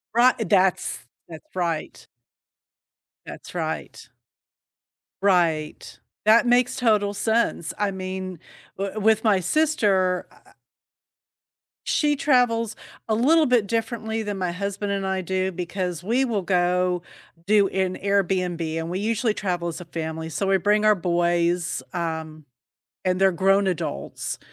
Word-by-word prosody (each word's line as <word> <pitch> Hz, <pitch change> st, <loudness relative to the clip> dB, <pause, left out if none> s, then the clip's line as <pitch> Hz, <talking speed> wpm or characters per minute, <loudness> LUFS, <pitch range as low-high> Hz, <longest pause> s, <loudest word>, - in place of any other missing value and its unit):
Righ 250 Hz, +2 st, +6 dB
that's 190 Hz, -1 st, +2 dB, 0.3 s
that's 160 Hz, +2 st, -13 dB
right. 170 Hz, -3 st, -3 dB, 1.2 s
That's -, -, -10 dB
right. -, -, -4 dB, 1.1 s
Right. 170 Hz, -6 st, 0 dB, 0.3 s
That 225 Hz, +3 st, +5 dB
makes 245 Hz, 0 st, +3 dB
total 210 Hz, -5 st, +2 dB
sense, 220 Hz, -6 st, 0 dB
I 205 Hz, -1 st, 0 dB
mean, 185 Hz, -2 st, -5 dB, 0.4 s
w 200 Hz, +2 st, -3 dB
with 220 Hz, +1 st, +3 dB
my 205 Hz, -4 st, +4 dB
sister 190 Hz, -, +1 dB
I -, -, -21 dB
I -, -, -22 dB, 1.3 s
She 295 Hz, -1 st, +2 dB
travels 245 Hz, -6 st, +2 dB, 0.3 s
a 220 Hz, -, +1 dB
little 305 Hz, +8 st, +4 dB
bit 240 Hz, -5 st, +2 dB
differently 225 Hz, 0 st, -2 dB
than 205 Hz, -2 st, -4 dB
my 180 Hz, -2 st, -1 dB
husband 200 Hz, +2 st, -3 dB
and 195 Hz, -1 st, -2 dB
I 190 Hz, 0 st, -1 dB
do, 190 Hz, +1 st, -1 dB
because 180 Hz, -1 st, -4 dB
we 245 Hz, +6 st, +1 dB
will 215 Hz, -5 st, -1 dB
go 180 Hz, -1 st, +1 dB, 0.4 s
do 205 Hz, -1 st, +4 dB
an 185 Hz, -1 st, -1 dB
Airbnb, 180 Hz, -5 st, 0 dB
and 165 Hz, +1 st, -3 dB
we 185 Hz, +2 st, -2 dB
usually 220 Hz, +1 st, 0 dB
travel 175 Hz, -3 st, -2 dB
as 170 Hz, -, -5 dB
a 175 Hz, -, -9 dB
family, 160 Hz, 0 st, -5 dB
so 195 Hz, +5 st, -2 dB
we 195 Hz, 0 st, +4 dB
bring 210 Hz, +3 st, +2 dB
our 215 Hz, -1 st, +5 dB
boys, 175 Hz, -1 st, 0 dB
um, 160 Hz, -3 st, -4 dB, 0.6 s
and 185 Hz, +1 st, +1 dB
they're 190 Hz, -1 st, +5 dB
grown 195 Hz, +3 st, +2 dB
adults. 155 Hz, -, -4 dB
190 Hz, 135 wpm, -24 LUFS, 175-215 Hz, 1.3 s, Righ